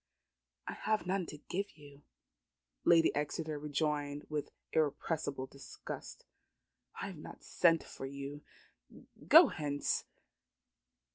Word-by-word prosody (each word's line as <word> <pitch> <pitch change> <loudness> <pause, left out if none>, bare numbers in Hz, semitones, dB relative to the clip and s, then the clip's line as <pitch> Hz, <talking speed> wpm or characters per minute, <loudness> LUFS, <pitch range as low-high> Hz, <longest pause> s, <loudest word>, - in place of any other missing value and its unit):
"I - - -2
have 215 -3 0
none 185 -1 0
to 150 - -7
give 195 +6 -4
you," 145 -1 -14 0.8
Lady 165 -1 +6
Exeter 150 +1 -2
rejoined 145 -1 -1
with 150 -1 -2 0.2
irrepressible 150 -2 0
disgust. 135 +1 -9 0.7
"I - - -2
have 185 - -8
not - - -10
sent 165 -2 +4
for 135 - -7
you. 140 +1 -6 0.9
Go 325 -3 +10
hence." 145 -2 -1
150 Hz, 110 wpm, -34 LUFS, 145-165 Hz, 0.9 s, Go